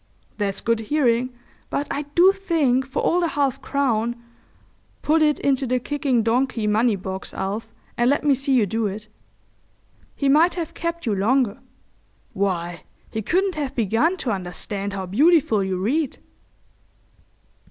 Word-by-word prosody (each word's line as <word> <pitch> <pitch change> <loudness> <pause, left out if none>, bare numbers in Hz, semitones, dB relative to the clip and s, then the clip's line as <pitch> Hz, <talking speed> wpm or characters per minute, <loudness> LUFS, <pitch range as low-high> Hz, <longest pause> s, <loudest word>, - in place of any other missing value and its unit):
"That's 200 -1 -1
good 230 -1 +1
hearing, 245 0 +1 0.4
but 290 - -2
I 290 - -2
do 365 +3 +7
think 310 -10 +1
for 270 - -2
all 350 - +2
the 345 - +1
half 275 -3 -1
crown—put 240 +4 -3
it 300 -1 +3
into 270 -1 0
the 250 +1 +1
kicking 275 -3 0
donkey 235 0 0
money 215 +2 +2
box, 190 0 -6
Alf, 200 +4 -4 0.3
and 240 +1 +4
let 285 - +1
me 290 -2 +4
see 270 0 +1
you 235 -4 +4
do 220 +2 -1
it—he 215 +6 -10
might 315 +6 +4
have 335 -3 -4
kept 335 0 -4
you 220 - +1
longer. 225 +3 +1 0.7
Why, 175 -4 -2 0.3
he 220 - -3
couldn't 375 - +1
have 290 -4 -4
begun 235 - +1
to 255 -8 -2
understand 195 +1 -4
how 190 -1 -4
beautiful 250 - +3
you 190 -1 -2
read." 260 - -1
245 Hz, 145 wpm, -23 LUFS, 210-290 Hz, 0.7 s, do